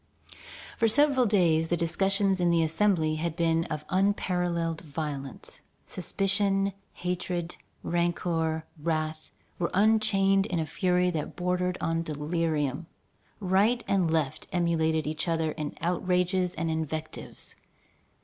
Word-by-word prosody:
For 230 - +3
several 270 +1 +4
days 165 -6 +3
the 175 - +1
discussions 195 +3 +1
in 175 - +3
the 170 -1 +3
Assembly 160 -2 +2
had 165 0 -2
been 165 -1 +2
of 150 0 -5
unparalleled 180 -4 0
violence. 145 -3 -5 0.2
Suspicion, 195 +2 0 0.2
hatred, 175 -1 -3 0.3
rancor, 165 -2 0 0.2
wrath, 155 -1 -2 0.3
were 170 - 0
unchained 200 -2 +3
in 180 - -2
a 160 - 0
fury 180 +2 +1
that 155 -3 -4
bordered 180 0 0
on 165 0 0
delirium. 155 -1 -1 0.5
Right 205 +5 +2
and 185 -4 +2
left 155 -4 -1
emulated 160 -3 +1
each 155 +3 -3
other 165 -2 +1
in 150 -1 -5
outrages 180 +1 +1
and 165 0 -1
invectives. 160 0 -3
170 Hz, 120 wpm, -28 LUFS, 160-190 Hz, 0.5 s, several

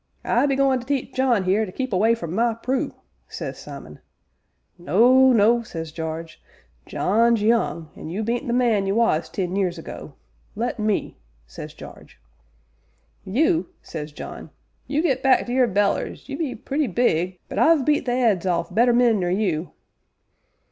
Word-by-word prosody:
'I 285 - +2
be 275 - +1
goin' 270 -1 +2
to 245 - -10
teach 275 -1 -2
John 245 -7 +1
'ere 200 +4 +3
to 195 - -5
keep 260 +2 -4
away 220 +5 +3
from 170 -8 -6
my 230 +2 +1
Prue,' 255 +3 -2 0.3
says - - -6
Simon. - - -10 0.8
'No, 250 +9 +5
no,' 235 +1 +4
says 165 -8 -7
Jarge, 160 0 -6 0.5
'John's 230 +2 +2
young, 215 -8 0
an' - - -8
you 195 +6 -3
bean't 235 +3 -2
the - - -1
man 230 -5 +2
you 195 - 0
was 230 -9 +1
ten 185 -1 -3
years 185 -3 0
ago 165 - -9 0.4
let 240 +2 -3
me,' 215 -1 -1 0.3
says 65 - -10
Jarge. - - -13 1.1
'You?' 320 - +1 0.2
says 150 -2 -7
John, - - -9 0.4
'you 295 +3 0
get 265 -6 +1
back 265 -1 +3
to 245 - -4
your 255 -1 +3
bellers 200 -1 -1
you - - -5
be 300 -7 -3
purty 285 +1 -2
big, 185 -4 0
but - - -4
I've 315 -5 +4
beat 295 -3 +1
the 245 - +1 0.2
'eads 190 -2 -3
off 170 -1 -1
better 240 +2 +4
men 235 -3 +3
nor 175 -1 -1
you!' 180 -4 -1
225 Hz, 170 wpm, -23 LUFS, 185-255 Hz, 1.1 s, No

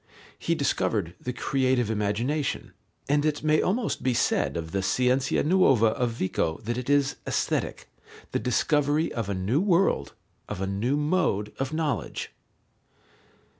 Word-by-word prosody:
He 170 - 0
discovered 105 - 0
the 125 - -3
creative 130 -3 +1
imagination, 115 +8 -1 0.4
and 145 +1 +2
it 150 -1 0
may 155 0 +3
almost 220 +5 -1
be 125 -2 +1
said 70 -8 +1
of 80 -1 -5
the 95 - 0
Scienza 130 +6 +1
nuova 135 - +4
of 120 +2 0
Vico 95 -7 -1
that 120 +2 -2
it 125 +2 -4
is 145 -1 +2
Aesthetic, - - -1 0.4
the - - 0
discovery 145 +5 +1
of 115 -4 -3
a 100 - -1
new 100 - +1
world, 185 - +2 0.3
of - - -4
a 95 - -1
new 105 +9 0
mode 150 - 0
of 135 0 -2
knowledge. 155 - -2
130 Hz, 145 wpm, -26 LUFS, 105-150 Hz, 0.4 s, nuova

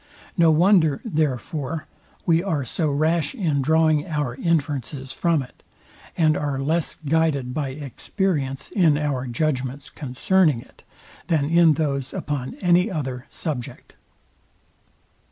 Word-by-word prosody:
No 170 -3 +5
wonder, 160 -2 +4
therefore, 155 - -2 0.4
we 165 -1 +3
are 160 -8 -1
so 155 +6 -1
rash 155 - +1
in 160 - 0
drawing 155 +2 +3
our 150 -6 -2
inferences 140 -3 -2
from 165 0 +1
it, 125 - -17 0.6
and 155 -2 +4
are 145 -2 -2
less 155 +4 0
guided 145 -5 +1
by 140 -1 -2
experience 140 - -3
in 165 -7 +3
our 140 -4 -1
judgments 135 0 -2
concerning 150 +2 +1
it, - - -16 0.5
than 155 -4 +2
in 170 -2 +6
those 140 -3 -2
upon 140 -3 -3
any 180 +3 +3
other 130 -7 -4
subject. 140 -8 -5
150 Hz, 120 wpm, -23 LUFS, 135-165 Hz, 0.6 s, in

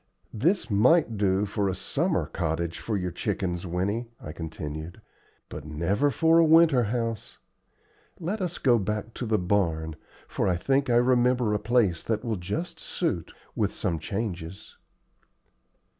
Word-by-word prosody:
"This 155 - +1
might 115 +4 +4
do 100 0 +2
for 100 -1 -1
a 95 - -2
summer 160 - 0
cottage 85 -1 -2
for 110 -3 -2
your 90 -1 -2
chickens, 90 +2 -2
Winnie," 100 +7 -1
I - - -7
continued, 80 0 -6 0.5
"but 75 - -8
never 85 - 0
for 165 +3 +4
a - - +7
winter 160 -6 +5
house. 115 0 -3 0.8
Let 190 +5 -3
us 180 -2 -2
go 120 -4 +3
back 105 +2 -3
to 120 - -4
the 110 0 +2
barn, 85 -5 0 0.3
for - - -1
I 90 - +2
think 135 +8 +1
I 120 - +3
remember 125 -2 +3
a 105 - +1
place 105 -6 +2
that 110 +1 -2
will 110 -3 -1
just 160 - -4
suit, 95 - -2 0.2
with - - +1
some 85 - -1
changes." 95 -1 -5
105 Hz, 150 wpm, -27 LUFS, 90-125 Hz, 0.8 s, a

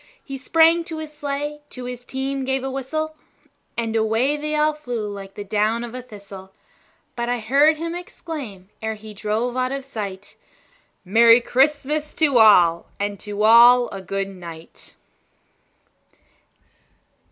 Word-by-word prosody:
He 275 -1 -7
sprang 330 +4 +4
to 325 -2 -6
his 310 -1 -7
sleigh, 295 +1 -4
to 250 -1 -8
his 245 0 -7
team 270 +1 -3
gave 265 0 -1
a 270 - -3
whistle, 310 +4 -3 0.6
And 225 -1 -2
away 225 +6 +1
they 305 +1 -3
all 305 0 +2
flew 245 -8 -5
like 195 -1 -9
the 205 - -6
down 215 +3 0
of 240 -1 -7
a 255 - -5
thistle; 200 -5 -12 0.6
But 235 0 -3
I 245 - 0
heard 280 +7 +3
him 335 +1 -4
exclaim, 290 - -8
ere 220 0 -3
he 215 0 -11
drove 220 +4 -2
out 255 0 0
of 275 -1 -4
sight, 200 -7 -7 0.7
"Merry 230 +4 +6
Christmas 295 +4 0
to 285 -6 +3
all, 175 -6 +5
and 205 -1 -3
to 210 0 -4
all 240 +2 +7
a 195 - -7
good 195 +1 -3
night!" 170 -3 -12
245 Hz, 150 wpm, -22 LUFS, 210-285 Hz, 0.7 s, all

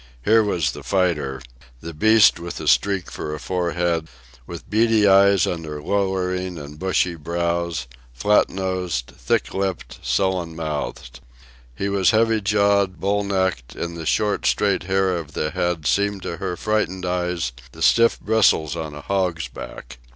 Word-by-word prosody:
Here 110 +1 +5
was 90 -7 0
the - - -9
fighter 80 -9 -1 0.4
the 85 +5 -8
beast 110 +3 +5
with 85 0 -6
a - - -6
streak 100 -4 +2
for 75 0 -5
a - - -8
forehead, 85 -1 -1 0.4
with - - -9
beady 110 0 +3
eyes 100 -1 +5
under 80 -3 -4
lowering 95 0 -1
and 75 0 -9
bushy 90 -1 +1
brows, 85 -1 -2 0.3
flat 105 +13 +2
nosed, 90 -9 -3
thick - - -1
lipped, 95 -2 -3
sullen 90 -4 -1
mouthed. 75 -6 -5 0.6
He 100 - -2
was 100 -2 +2
heavy 115 0 +3
jawed, 100 -2 +2
bull 100 +1 0
necked, 95 -10 -1
and 85 0 -4
the 80 -2 -6
short, 105 -1 +1
straight 100 -3 +1
hair 95 0 +1
of 80 -3 -6
the 75 - -2
head 85 -3 -2
seemed 100 +1 +1
to 85 - -4
her 90 - -4
frightened 95 -2 -1
eyes 90 -5 -1 0.2
the - - -6
stiff 115 0 +4
bristles 100 -9 +2
on 80 -2 -5
a 75 - -8
hog's 90 -3 -1
back. 65 0 -10
90 Hz, 155 wpm, -22 LUFS, 80-100 Hz, 0.6 s, Here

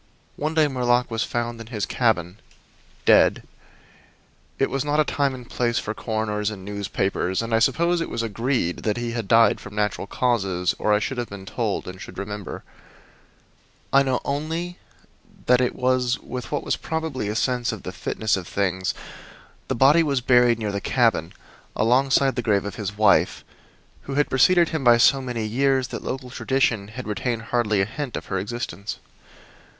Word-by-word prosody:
One 155 +2 -2
day 155 -2 +4
Murlock 125 -2 +1
was 115 -1 -1
found 120 -1 -3
in 115 - -10
his 110 -4 -3
cabin, 100 -5 0 0.7
dead. - - +5 1.1
It 135 - +1
was 135 -1 -1
not 150 +1 0
a - - +6
time 140 -3 0
and 125 -2 -11
place 120 -1 -1
for 105 - -2
coroners 110 -2 -2
and 95 -3 -8
newspapers, 100 -2 -2
and 115 0 -4
I 115 - +4
suppose 170 +8 +2
it - - -3
was 115 - -2
agreed 115 -4 -1
that 105 +1 -1
he 120 -1 -3
had 115 -3 -4
died 115 0 +5
from 105 0 -11
natural 105 -1 -1
causes 100 -8 0
or 105 - +1
I 105 - +5
should 125 +4 -3
have 120 - -3
been 100 -1 -9
told, 110 0 -2
and 90 +1 -8
should - - -10
remember. 105 0 -6 1.3
I 140 - +7
know 130 -2 +1
only 160 +5 -3 0.7
that 125 0 +4 0.2
with 125 -1 -1
what 145 - -1
was - - -1
probably 160 -8 -3
a 105 - -2
sense 125 0 0
of - - -7
the - - -5
fitness 110 -1 -1
of 95 -3 -5
things 95 -2 -1 0.7
the - - -1
body 140 +7 +6
was 140 -5 +1
buried 125 -2 +4
near 110 -2 -2
the 100 0 -3
cabin, 115 -11 +1 0.4
alongside 135 +3 +3
the 125 - -1
grave 105 -4 +1
of 100 - -4
his 105 -1 -5
wife, 105 -2 +3 0.6
who 135 - -4
had 145 +1 +1
preceded 170 +6 +5
him 160 -4 -2
by 120 -1 +6
so 135 +3 +5
many 120 -4 -3
years 130 +3 +1
that - - -6
local 130 -1 -5
tradition 125 -7 0
had 120 +4 -8
retained 115 +2 -2
hardly 110 -4 +2
a - - +2
hint 135 +4 -5
of - - -7
her 95 - +1
existence. 105 -2 -5
120 Hz, 180 wpm, -23 LUFS, 105-130 Hz, 1.3 s, I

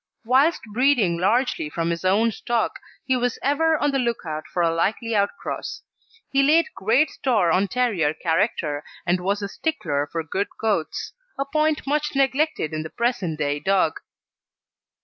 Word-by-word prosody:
Whilst 270 +8 +3
breeding 235 -9 +3
largely 215 - +1
from 165 +2 -1
his 170 +1 -3
own 210 +5 +3
stock, 230 +1 -2 0.3
he 260 - +2
was 245 -1 0
ever 315 +3 +2
on 290 -1 +1
the 275 - 0
look 235 -6 -1
out 155 -1 -5
for 175 - -1
a 165 -1 +2
likely 215 +7 -1
outcross. 200 +6 -2 0.5
He 275 - +3
laid 310 +4 +3
great 240 +10 +2
store 215 -10 +1
on 190 +4 +2
terrier 200 -10 +1
character, 160 -4 0 0.2
and 175 +1 +2
was 200 +3 -1
a - - -1
stickler 145 - -2
for 165 -1 -2
good 190 +6 -2
coats; 210 -8 -1 0.2
a 275 - -1
point 305 +1 0
much 295 +1 -1
neglected 275 - +1
in 155 - -2
the 160 - -6
present 200 -9 -1
day 145 -1 -1
dog. 190 -3 +1
215 Hz, 165 wpm, -23 LUFS, 170-270 Hz, 0.5 s, Whilst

